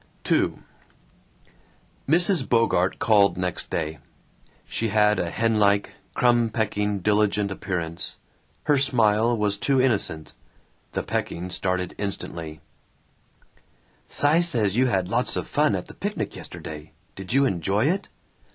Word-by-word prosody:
II - - +2 1.5
Mrs. 170 -2 +3
Bogart 115 -6 +2
called 100 -4 +3
next 90 -1 -3
day. 80 -2 -3 0.7
She 115 - -2
had 105 0 +3
a 85 - -1
hen 115 +3 0
like, 100 0 +2 0.2
crumb 120 -2 +3
pecking, 105 -2 -1
diligent 105 0 +1
appearance. 85 -4 -4 0.5
Her 145 -2 +3
smile 115 -3 +3
was 105 -1 0
too 135 +5 +1
innocent. 105 -11 0 0.6
The - - -2
pecking 90 +2 -3
started 90 -1 -2
instantly: 85 -6 -5 1.5
"Cy 150 +3 +2
says 115 - +1
you 130 +2 +3
had 95 -6 0
lots 115 +3 -1
of 90 - -3
fun - - +2
at - - -4
the - - -12
picnic - - -4
yesterday. 75 0 -9 0.2
Did 95 +2 -6
you 140 +1 +4
enjoy 95 - 0
it?" 180 +6 0
105 Hz, 125 wpm, -24 LUFS, 90-120 Hz, 1.5 s, you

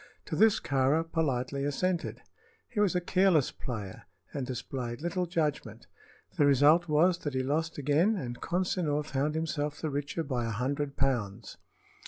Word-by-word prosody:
To - - -4
this 220 -1 +5
Kāra 140 +4 +2
politely 140 -3 -1
assented. 175 +5 -1 0.4
He 230 - -4
was 200 -3 +3
a 180 - +2
careless 175 -5 +3
player, 105 -7 -6 0.3
and 135 -3 -3
displayed 125 -1 -4
little 175 +2 -2
judgment. 150 -9 -2 0.5
The 145 - +6
result 145 +5 +5
was 170 +4 +3
that 145 -5 -4
he 130 - +1
lost 160 +4 -1
again, 150 +9 +2
and 120 -10 -5
Consinor 170 -4 0
found 145 +1 -1
himself 150 -2 -2
the 155 - -2
richer 145 +3 -2
by 125 -5 -2
a - - -2
hundred 140 +5 -2
pounds. 120 -8 -1
145 Hz, 155 wpm, -30 LUFS, 130-170 Hz, 0.5 s, The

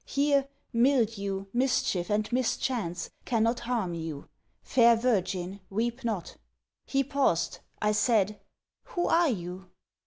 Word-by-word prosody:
Here, 280 -1 +2 0.3
Mildew, 225 -6 +1
Mischief, 240 -8 +1
and 210 0 +1
Mischance, 240 -7 -1
cannot 230 0 +1
harm 235 -7 -1
you. 160 -3 -6 0.3
Fair 235 -2 +5
virgin 195 -5 0
weep 235 +5 -2
not!' 215 -8 -3 0.5
He 275 0 +2
paused, 260 - +1 0.2
I 210 - +3
said, 210 -2 +2 0.5
'Who 350 - -2
are 335 -1 +4
you?' 185 -3 -5
225 Hz, 115 wpm, -28 LUFS, 190-250 Hz, 0.5 s, Fair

